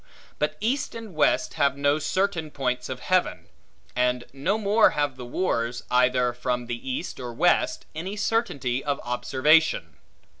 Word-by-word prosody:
But 150 +1 -1
east 270 +7 -1
and 225 -4 -8
west 155 - +2
have 140 -1 +3
no 145 +1 +2
certain 180 -1 -1
points 125 -3 -2
of 130 -1 -5
heaven; 185 -1 0 0.5
and 125 0 +1
no 170 +10 0
more 215 +1 +4
have 145 -3 0
the 125 -1 -8
wars, 120 -6 -1
either 125 0 +3
from 125 0 -2
the 120 +2 -5
east 130 +7 -4
or 120 -1 -5
west, 310 - +2
any 180 +6 -5
certainty 185 - -1
of 145 -1 -1
observation. 130 - +2
140 Hz, 150 wpm, -25 LUFS, 125-185 Hz, 0.5 s, more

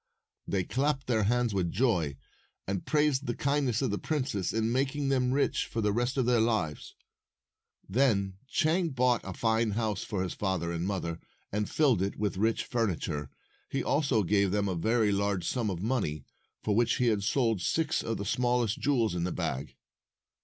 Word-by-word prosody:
They 95 -2 0
clapped 135 +5 0
their 110 -4 +1
hands 120 0 +1
with 90 -4 0
joy, 90 - +1 0.5
and 95 -1 -3
praised 150 -3 +2
the 120 - -1
kindness 140 -4 0
of 130 - 0
the 105 - -2
princess 130 - -1
in 110 0 0
making 135 +2 0
them 125 -2 +2
rich 140 +2 +1
for 115 - -4
the 105 -2 +1
rest 120 +4 0
of 130 - +2
their 120 -1 +3
lives. 110 - -1 0.9
Then 100 -4 +1
Chang 165 +5 +1
bought 125 -3 +2
a 95 - -6
fine 110 +3 +1
house 110 -4 -1
for 95 -3 -2
his 90 - -3
father 95 -4 -1
and 85 +2 -2
mother, 85 -4 -3 0.3
and 105 +1 -1
filled 135 - +3
it 100 +1 -1
with 105 -3 -2
rich 110 +3 +1
furniture. 85 - -2 0.4
He - - -1
also 140 -7 +2
gave 100 +1 +2
them 100 +1 0
a 95 - 0
very 110 +5 +2
large 100 -3 0
sum 120 -4 0
of 90 -1 -4
money, 105 - -1 0.4
for 105 - +1
which 120 +1 +3
he 125 - +1
had 110 -4 +2
sold 115 -2 +1
six 160 - 0
of 115 -1 -2
the 100 - -4
smallest 120 0 +1
jewels 120 -8 +1
in 85 -1 -1
the 90 - -1
bag. 70 0 -3
110 Hz, 185 wpm, -29 LUFS, 95-125 Hz, 0.9 s, their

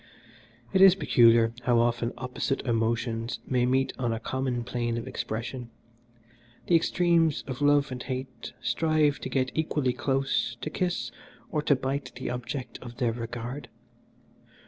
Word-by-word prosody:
"It 190 - +4
is 190 -1 +9
peculiar 115 -9 +5
how 120 -1 +4
often 120 0 +1
opposite 125 +2 -2
emotions 115 0 -1
may 125 -1 +1
meet 130 +1 +1
on 120 -2 0
a 115 - -2
common 130 0 -2
plane 120 -1 -2
of 115 - -5
expression. 115 +2 -4 1.0
The - - 0
extremes 165 -2 +2
of 130 0 -6
love 145 -1 +3
and 125 -1 -5
hate 130 -2 -6
strive 155 -3 +2
to - - -5
get 130 0 0
equally 150 -5 0
close 135 -3 0
to 155 - -4
kiss 180 -1 -1 0.4
or 150 - 0
to 145 -1 +3
bite 135 0 -3
the 120 0 -4
object 125 +1 -5
of 120 -1 -10
their 120 -2 +1
regard. 120 +3 -6
130 Hz, 145 wpm, -27 LUFS, 120-145 Hz, 1.0 s, is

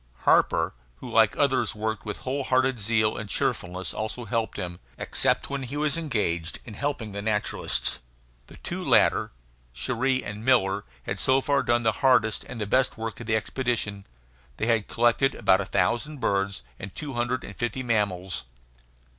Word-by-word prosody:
Harper, 80 -1 +3 0.2
who 60 - -9
like - - +5
the - - -11
others - - +2
worked 110 -1 -3
with 105 - -3
whole 135 +2 -2
hearted 130 -1 +2
zeal 110 0 +2
and 110 - -6
cheerfulness, 90 -1 -2
also 110 +2 -4
helped 115 -2 -2
him, 90 -3 -4 0.2
except - - +1
when 140 -1 -2
he 135 +3 -5
was 150 -1 +3
engaged 105 - -1
in 110 - -8
helping 125 -3 -3
the 100 +1 -4
naturalists. 105 0 +2 0.5
The - - -14
two - - -5
latter, - - +3 0.4
Cherrie 130 - 0
and 105 +1 -6
Miller, 100 -6 +2 0.2
had 95 +7 -4
so 130 +5 +3
far 140 0 +1
done 120 0 +1
the 110 - +3
hardest 120 -5 +3
and 125 - -8
the 105 - -1
best 130 +5 +1
work 110 -1 -5
of 120 - -8
the 110 - +2
expedition. 110 -3 -2 0.5
They - - -1
had 115 -3 +2
collected 120 +3 +2
about 95 +1 +3
a - - -3
thousand 120 +11 0
birds 100 - 0 0.2
and 95 0 -8
two 145 -2 -5
hundred 120 +1 -1
and - - -9
fifty 120 +2 -2
mammals. 95 - -1
110 Hz, 175 wpm, -26 LUFS, 100-130 Hz, 0.5 s, like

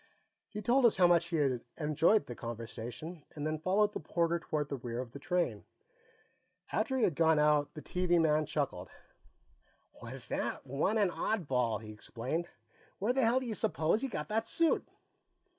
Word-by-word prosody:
He 210 -1 -6
told 245 +2 +5
us 220 - +1
how 180 - +6
much 175 -1 +5
he 175 - -3
had 135 -6 +1 0.2
enjoyed 160 +7 +3
the 120 - -6
conversation, 120 +7 -7
and 145 -1 -4
then 155 0 -1
followed 205 +5 +2
the - - -3
porter 170 +2 0
toward 150 -2 -2
the 140 - -4
rear 120 -1 -5
of 125 -2 -5
the 140 - -9
train. 155 -10 -1 1.1
After 245 +5 0
he 250 - +1
had 175 - +3
gone 160 +1 +4
out, 150 -1 +3
the 155 - -8
TV 180 -1 +1
man 155 -2 +3
chuckled. 140 -12 -2 1.1
"Was - - -7
that - - -2
one 150 - 0
an 200 -4 +3
oddball!" 125 - 0
he 110 - -8
exclaimed. 125 +10 -4 0.5
"Where 215 +6 +1
the 265 - +2
hell 240 +2 +4
do - - -5
you 230 - -2
suppose 170 0 +1
he 270 - -1
got 150 -11 -4
that 225 +1 0
suit?" 330 +5 +2
160 Hz, 180 wpm, -32 LUFS, 140-200 Hz, 1.1 s, how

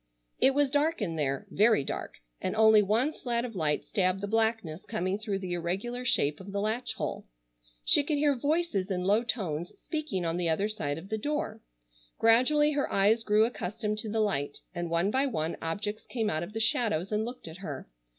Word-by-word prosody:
It 270 - +4
was 285 -2 +2
dark 305 +4 +2
in 180 -7 -2
there, 140 -3 -1
very 215 -5 +4
dark, - - -4 0.3
and - - -2
only 220 -1 +6
one 225 +9 +1
slat 240 -4 -2
of 230 -3 -7
light 155 -4 0
stabbed 185 -1 +1
the - - -1
blackness 220 -6 0
coming 195 -2 -2
through 210 -2 -2
the 185 -2 -4
irregular 195 +9 -3
shape 145 - +2
of 195 +1 -9
the 200 - -2
latch 220 +4 -1
hole. - - -4 0.6
She 290 - +6
could 295 +1 0
hear 290 0 +3
voices 285 - 0
in 180 -2 -1
low 205 +4 +3
tones 175 -9 -2
speaking 300 - -3
on 165 +1 -1
the 175 -2 +1
other 195 +6 +1
side 145 -9 -2
of 175 +4 -9
the 220 - -2
door. 295 +5 -2 0.6
Gradually 255 +7 +4
her 285 -1 -1
eyes 205 +4 +3
grew 215 0 +4
accustomed 215 -1 -3
to 220 - -3
the 220 +1 0
light 145 -10 -1 0.2
and 175 -1 -3
one 170 +4 +1
by 270 +3 +2
one 160 - -2
objects 205 +6 -4
came 225 -4 -1
out 155 - -1
of 175 +5 -6
the 225 - -3
shadows 220 -5 +1
and 210 +1 +1
looked 240 -5 -6
at 160 +1 -9
her. 145 -8 -7
210 Hz, 205 wpm, -29 LUFS, 180-240 Hz, 0.6 s, only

